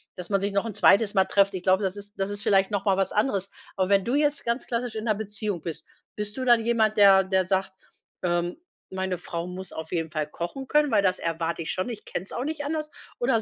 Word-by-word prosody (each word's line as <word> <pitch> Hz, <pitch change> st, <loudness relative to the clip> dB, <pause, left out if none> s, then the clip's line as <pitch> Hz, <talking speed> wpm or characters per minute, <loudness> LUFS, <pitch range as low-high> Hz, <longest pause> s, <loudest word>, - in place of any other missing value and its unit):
dass 180 Hz, 0 st, -8 dB
man 195 Hz, -, +2 dB
sich 200 Hz, +1 st, -1 dB
noch 200 Hz, +2 st, +1 dB
'n 225 Hz, -, -4 dB
zweites 205 Hz, +1 st, +4 dB
Mal 190 Hz, -1 st, +5 dB
trifft. 200 Hz, 0 st, +3 dB
Ich 185 Hz, -, -5 dB
glaube, 190 Hz, +2 st, +3 dB
das 190 Hz, +1 st, -1 dB
ist 205 Hz, 0 st, -7 dB
das 195 Hz, +1 st, 0 dB
ist 205 Hz, +1 st, -4 dB
vielleicht 195 Hz, 0 st, +3 dB
noch 200 Hz, -1 st, -1 dB
mal 195 Hz, -, +4 dB
was 195 Hz, -, +1 dB
anderes. 200 Hz, -3 st, 0 dB, 0.3 s
Aber, 185 Hz, 0 st, +1 dB
wenn 195 Hz, -1 st, +3 dB
du 240 Hz, -, -1 dB
jetzt 295 Hz, 0 st, +1 dB
ganz 235 Hz, +2 st, -1 dB
klassisch 235 Hz, -1 st, -2 dB
in 220 Hz, +1 st, -4 dB
'ner 215 Hz, -, +2 dB
Beziehung 205 Hz, -3 st, -3 dB
bist, 165 Hz, -2 st, -4 dB, 0.3 s
bist 210 Hz, +2 st, -4 dB
du 260 Hz, -, -2 dB
dann 240 Hz, -2 st, +5 dB
jemand, 220 Hz, -2 st, +2 dB
der 195 Hz, -2 st, +7 dB
der 190 Hz, -1 st, +1 dB
sagt, 190 Hz, 0 st, 0 dB, 0.5 s
ähm: 175 Hz, 0 st, 0 dB, 0.4 s
„Meine 190 Hz, -1 st, -2 dB
Frau 170 Hz, 0 st, -5 dB
muss 180 Hz, +1 st, -7 dB
auf 160 Hz, 0 st, -7 dB
jeden 165 Hz, -2 st, -1 dB
Fall 155 Hz, -1 st, -2 dB
kochen 175 Hz, -, -6 dB
können, 300 Hz, -1 st, +3 dB
weil 205 Hz, -3 st, +3 dB
das 185 Hz, -1 st, +2 dB
erwarte 165 Hz, 0 st, -2 dB
ich -, -, -2 dB
schon, 185 Hz, +6 st, -2 dB
ich 225 Hz, -3 st, -7 dB
kenn's 185 Hz, -, -5 dB
auch 250 Hz, -, -3 dB
nicht 310 Hz, -1 st, -3 dB
anders.“ 305 Hz, +1 st, -3 dB, 0.3 s
Oder 240 Hz, -2 st, +2 dB
200 Hz, 250 wpm, -26 LUFS, 185-225 Hz, 0.5 s, der